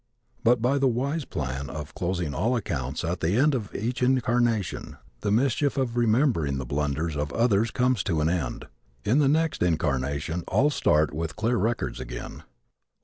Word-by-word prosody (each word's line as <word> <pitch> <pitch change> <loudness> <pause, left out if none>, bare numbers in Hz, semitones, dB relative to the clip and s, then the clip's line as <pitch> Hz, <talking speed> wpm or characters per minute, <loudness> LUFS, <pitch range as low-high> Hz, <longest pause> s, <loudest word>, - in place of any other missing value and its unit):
But 115 0 +3
by 135 +3 +2
the 135 - +3
wise 135 +5 -1
plan 70 -2 -4
of 75 -2 -7
closing 85 -4 -2
all 115 - +1
accounts 70 - -3
at 85 +2 -2
the 85 +5 +1
end 145 +3 +4
of 110 -6 -3
each 120 +4 -2
incarnation 120 -5 +1 0.2
the 105 - -2
mischief 135 +5 +1
of 125 -3 0
remembering 115 - +2
the 65 - -4
blunders 75 +4 -1
of 75 0 -2
others 115 -1 +2
comes 125 -2 +1
to 80 -4 0
an 75 - +2
end. 80 -8 -2 0.4
In 125 +7 +3
the 140 -2 +4
next 160 0 +1
incarnation 75 0 0
all 145 +3 +3
start 75 - +2
with 80 +1 -3
clear 115 +3 0
records 110 - -1
again. - - -7
105 Hz, 170 wpm, -26 LUFS, 75-125 Hz, 0.4 s, end